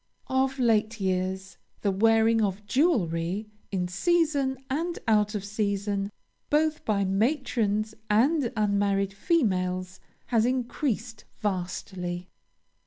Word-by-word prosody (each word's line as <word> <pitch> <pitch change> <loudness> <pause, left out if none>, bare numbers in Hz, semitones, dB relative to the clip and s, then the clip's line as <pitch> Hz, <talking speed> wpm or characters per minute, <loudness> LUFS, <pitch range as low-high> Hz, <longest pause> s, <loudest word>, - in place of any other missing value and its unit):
Of 265 +1 +1
late 225 -2 +2
years, 190 0 -2 0.2
the 200 - +1
wearing 225 +3 +4
of 200 0 -1
jewelry, 205 - +1 0.2
in 180 -2 -1
season 285 - +1
and 330 +6 -2
out 210 -1 +3
of 200 -1 -3
season, 200 -1 -1 0.4
both 310 +1 +2
by 200 -2 +1
matrons 215 -1 0 0.2
and 255 +5 +3
unmarried 200 -2 +1
females, 185 - 0 0.3
has 230 -3 +2
increased 245 -2 -2
vastly. 180 -2 -3
210 Hz, 105 wpm, -27 LUFS, 195-255 Hz, 0.4 s, wearing